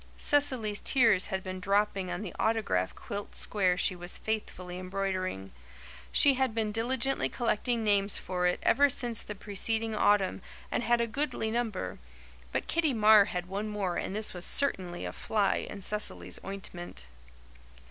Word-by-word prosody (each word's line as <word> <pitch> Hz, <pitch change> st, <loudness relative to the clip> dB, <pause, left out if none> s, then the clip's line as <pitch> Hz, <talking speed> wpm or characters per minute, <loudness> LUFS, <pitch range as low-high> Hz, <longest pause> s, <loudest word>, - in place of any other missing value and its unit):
Cecily's 255 Hz, -8 st, +2 dB
tears 225 Hz, -8 st, +4 dB
had 190 Hz, -2 st, -3 dB
been 185 Hz, 0 st, -5 dB
dropping 195 Hz, 0 st, 0 dB
on 175 Hz, +3 st, -4 dB
the 185 Hz, -, -6 dB
autograph 215 Hz, -, 0 dB
quilt 205 Hz, 0 st, -7 dB
square 185 Hz, -4 st, +2 dB
she 185 Hz, -, +1 dB
was 175 Hz, +1 st, -5 dB
faithfully 185 Hz, -5 st, -4 dB
embroidering. 185 Hz, -, -3 dB, 0.6 s
She 280 Hz, -, +6 dB
had 260 Hz, -3 st, 0 dB
been 220 Hz, -2 st, 0 dB
diligently 250 Hz, +4 st, 0 dB
collecting 235 Hz, 0 st, -1 dB
names 200 Hz, -1 st, +2 dB
for 180 Hz, -1 st, -1 dB
it 180 Hz, -, 0 dB
ever 285 Hz, +3 st, +4 dB
since 240 Hz, -4 st, -1 dB
the 210 Hz, -, -7 dB
preceding 220 Hz, +3 st, -2 dB
autumn 205 Hz, -2 st, +2 dB, 0.3 s
and -, -, 0 dB
had 240 Hz, 0 st, +2 dB
a -, -, +2 dB
goodly 240 Hz, -2 st, -2 dB
number; 225 Hz, -5 st, -3 dB, 0.5 s
but -, -, -2 dB
Kitty 325 Hz, -4 st, +1 dB
Marr 215 Hz, -1 st, +7 dB
had 180 Hz, -3 st, -4 dB
one 200 Hz, +3 st, -4 dB
more 200 Hz, -4 st, -2 dB
and 195 Hz, -, -3 dB
this 215 Hz, 0 st, +2 dB
was 180 Hz, -1 st, -5 dB
certainly 185 Hz, -11 st, +1 dB
a -, -, -5 dB
fly 205 Hz, -3 st, 0 dB
in 200 Hz, -2 st, -7 dB
Cecily's 90 Hz, -, -2 dB
ointment. 175 Hz, -, -6 dB
205 Hz, 160 wpm, -30 LUFS, 185-225 Hz, 0.6 s, Marr